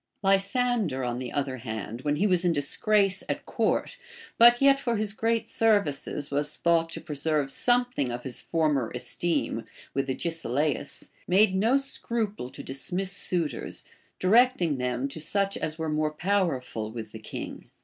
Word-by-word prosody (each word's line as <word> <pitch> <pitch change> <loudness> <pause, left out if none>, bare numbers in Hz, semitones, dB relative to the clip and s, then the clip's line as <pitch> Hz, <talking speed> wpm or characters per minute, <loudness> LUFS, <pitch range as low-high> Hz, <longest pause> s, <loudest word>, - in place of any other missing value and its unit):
Lysander, 195 - +1
on 120 0 -2
the 125 -2 -5
other 135 -2 -2
hand, 110 -1 -6
when 145 +1 0
he 185 +8 +1
was 180 -3 +2
in 175 -2 +3
disgrace 195 +7 +2
at - - -3
court, - - -1 0.4
but 240 +1 +8
yet 275 0 +5
for 240 -3 -1
his 210 -1 -1
great 225 +1 0
services 155 -9 +1
was 145 +1 -1
thought 165 -1 +2
to - - -5
preserve 150 -2 -1
something 245 - +2
of 120 +1 -5
his 130 -2 -3
former 150 -7 0
esteem 170 +7 -1 0.3
with 135 0 -1
Agesilaus, 145 -1 -2 0.2
made 190 +2 +4
no 225 +8 +3
scruple 225 - -3
to - - -9
dismiss 180 +8 -2
suitors, 175 -4 -1 0.3
directing 185 - +3
them 125 +1 -1
.to 150 +3 -6
such 195 +5 0
as 155 0 -3
were 160 -1 -3
more 155 0 0
powerful 155 - -1
with 110 -2 -7
the 110 - -9
king. 110 - -8
165 Hz, 155 wpm, -27 LUFS, 135-205 Hz, 0.4 s, but